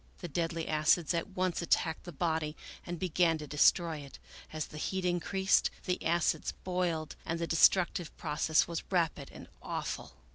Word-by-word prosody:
The 175 Hz, -, -6 dB
deadly 165 Hz, +1 st, -2 dB
acids 155 Hz, +2 st, +3 dB
at 170 Hz, +3 st, -1 dB
once 185 Hz, -3 st, -1 dB
attacked 165 Hz, -1 st, 0 dB
the 175 Hz, -, -7 dB
body 160 Hz, -1 st, -1 dB, 0.3 s
and 175 Hz, 0 st, -4 dB
began 170 Hz, -2 st, +2 dB
to 155 Hz, -, -7 dB
destroy 160 Hz, +3 st, +3 dB
it; 140 Hz, -1 st, -11 dB, 0.3 s
as 155 Hz, -1 st, -3 dB
the 150 Hz, -, -9 dB
heat 190 Hz, +3 st, -2 dB
increased, 190 Hz, +2 st, +2 dB, 0.2 s
the 180 Hz, -1 st, -1 dB
acids 170 Hz, 0 st, +1 dB
boiled 175 Hz, -4 st, -1 dB
and 165 Hz, -, -2 dB
the 170 Hz, -, -1 dB
destructive 170 Hz, 0 st, +3 dB
process 155 Hz, 0 st, +1 dB
was 170 Hz, -1 st, -3 dB
rapid 165 Hz, -6 st, 0 dB
and -, -, -11 dB
awful. -, -, -4 dB
170 Hz, 160 wpm, -32 LUFS, 155-180 Hz, 0.3 s, acids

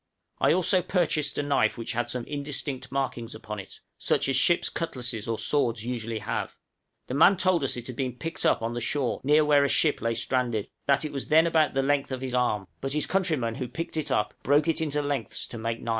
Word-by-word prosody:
I -, -, +4 dB
also 185 Hz, +2 st, +4 dB
purchased 155 Hz, -6 st, 0 dB
a 145 Hz, -, 0 dB
knife 145 Hz, -2 st, +1 dB
which 115 Hz, -, -4 dB
had 120 Hz, +1 st, -2 dB
some 125 Hz, -2 st, -3 dB
indistinct 140 Hz, -3 st, -5 dB
markings 125 Hz, -4 st, -3 dB
upon 105 Hz, -1 st, -7 dB
it, 95 Hz, -, -11 dB, 0.2 s
such -, -, +1 dB
as 135 Hz, -, +2 dB
ship's 170 Hz, +6 st, +3 dB
cutlasses 125 Hz, -9 st, -3 dB
or 115 Hz, -1 st, -1 dB
swords 115 Hz, -6 st, +1 dB
usually 115 Hz, -2 st, -3 dB
have; 110 Hz, +1 st, -3 dB, 0.5 s
the -, -, -6 dB
man 175 Hz, +7 st, +6 dB
told 185 Hz, -4 st, +2 dB
us 135 Hz, -, -1 dB
it 120 Hz, -, -6 dB
had 125 Hz, -, -5 dB
been 130 Hz, -2 st, -1 dB
picked 165 Hz, +1 st, -5 dB
up -, -, +2 dB
on 115 Hz, +1 st, -2 dB
the 120 Hz, -, -3 dB
shore 130 Hz, +1 st, -1 dB
near 150 Hz, +3 st, +4 dB
where 145 Hz, -1 st, +5 dB
a 140 Hz, -, +2 dB
ship 155 Hz, -, +2 dB
lay 115 Hz, 0 st, 0 dB
stranded; 120 Hz, -3 st, -1 dB, 0.2 s
that 140 Hz, +2 st, +3 dB
it 150 Hz, -, -5 dB
was 140 Hz, -, -3 dB
then 160 Hz, +2 st, +5 dB
about 160 Hz, -4 st, +2 dB
the 135 Hz, -, +2 dB
length 140 Hz, 0 st, +1 dB
of 130 Hz, -1 st, -3 dB
his 130 Hz, -1 st, -4 dB
arm, 110 Hz, -6 st, +1 dB
but 135 Hz, 0 st, -3 dB
his 150 Hz, -, 0 dB
countryman 155 Hz, -12 st, 0 dB
who 125 Hz, +2 st, -4 dB
picked 165 Hz, +7 st, -5 dB
it 155 Hz, -2 st, -2 dB
up -, -, 0 dB
broke 145 Hz, +2 st, +3 dB
it 165 Hz, 0 st, +1 dB
into 150 Hz, -2 st, 0 dB
lengths 140 Hz, -5 st, -3 dB
to 115 Hz, -, -8 dB
make 115 Hz, +1 st, -2 dB
knives. 115 Hz, -, -7 dB
135 Hz, 235 wpm, -27 LUFS, 120-150 Hz, 0.5 s, man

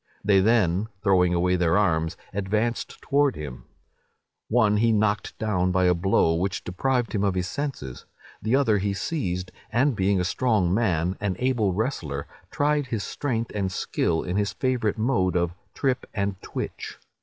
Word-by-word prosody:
They 100 Hz, -1 st, +4 dB
then, 100 Hz, -2 st, +2 dB, 0.2 s
throwing 90 Hz, -3 st, +3 dB
away 90 Hz, +1 st, +2 dB
their 85 Hz, 0 st, +2 dB
arms, 80 Hz, -5 st, +1 dB, 0.2 s
advanced 105 Hz, +4 st, -1 dB
towards 145 Hz, -1 st, +2 dB
him: 70 Hz, -5 st, -7 dB, 0.8 s
one 110 Hz, -3 st, +3 dB
he 115 Hz, +2 st, +3 dB
knocked 105 Hz, -1 st, 0 dB
down 95 Hz, -4 st, 0 dB
by 95 Hz, 0 st, +2 dB
a 90 Hz, -, +5 dB
blow, 85 Hz, -2 st, +2 dB
which 95 Hz, +3 st, -1 dB
deprived 125 Hz, +6 st, -1 dB
him 105 Hz, -2 st, 0 dB
of 100 Hz, -2 st, +1 dB
his 90 Hz, 0 st, -1 dB
senses; 95 Hz, -, -5 dB, 0.4 s
the 110 Hz, +4 st, +1 dB
other 115 Hz, -7 st, +3 dB
he 100 Hz, 0 st, -1 dB
seized, 90 Hz, -, -3 dB, 0.2 s
and 130 Hz, +2 st, +2 dB
being 95 Hz, 0 st, +2 dB
a -, -, +1 dB
strong 95 Hz, -2 st, +1 dB
man, 90 Hz, -5 st, +1 dB
an 100 Hz, -3 st, -1 dB
able 120 Hz, -5 st, +1 dB
wrestler, 85 Hz, -, -2 dB, 0.2 s
tried 145 Hz, -1 st, +1 dB
his 110 Hz, -5 st, -2 dB
strength 115 Hz, 0 st, -2 dB
and 95 Hz, -2 st, -1 dB
skill 80 Hz, -2 st, -1 dB
in 90 Hz, +2 st, -2 dB
his 105 Hz, 0 st, 0 dB
favourite 125 Hz, -5 st, 0 dB
mode 110 Hz, -7 st, +1 dB
of 85 Hz, -1 st, +1 dB, 0.2 s
'trip 130 Hz, -3 st, -1 dB
and 100 Hz, -2 st, -2 dB
twitch. -, -, -6 dB
100 Hz, 165 wpm, -25 LUFS, 90-115 Hz, 0.8 s, a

